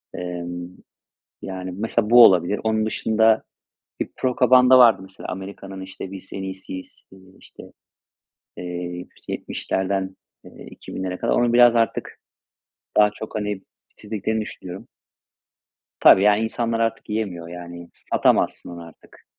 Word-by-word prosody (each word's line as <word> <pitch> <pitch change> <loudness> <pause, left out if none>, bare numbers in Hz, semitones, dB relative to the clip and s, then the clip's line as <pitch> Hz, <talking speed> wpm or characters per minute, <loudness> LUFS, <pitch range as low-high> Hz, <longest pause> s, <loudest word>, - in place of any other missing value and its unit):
Emm, 90 0 -5 0.7
yani, 95 -1 -6
mesela 110 +1 -1
bu 120 0 +9
olabilir. 90 +1 +3
Onun 110 -1 +1
dışında 110 0 +2 0.6
bir - - -2
propaganda 130 0 +5
vardı 115 -6 +6
mesela; 95 0 -11
Amerika'nın 95 0 -7
işte 95 0 -8
biz 95 -1 -9
en 95 - -5
iyisiyiz, 95 -1 -8
eee, 95 - -15 0.2
işte - - -14 1.6
70'lerden 95 0 -3 0.3
eee, - - -13
2000'lere - - -8
kadar. - - 0
Onu 120 -1 +2
biraz 120 -1 +6
artık, 115 -1 -1 0.8
daha 105 0 +6
çok 110 +1 -9
hani, 105 -2 -3 0.3
bitirdiklerini 110 +1 -3
düşünüyorum. 95 -3 -8 1.1
Tabii, 95 - +7
yani, 105 +1 +4
insanlar 115 0 -2
artık 115 0 -2
yemiyor, 95 -6 -3
yani. 85 0 -9
Satamazsın - - 0
onu 85 -1 -8
artık. 80 - -19
100 Hz, 120 wpm, -22 LUFS, 95-110 Hz, 1.6 s, bu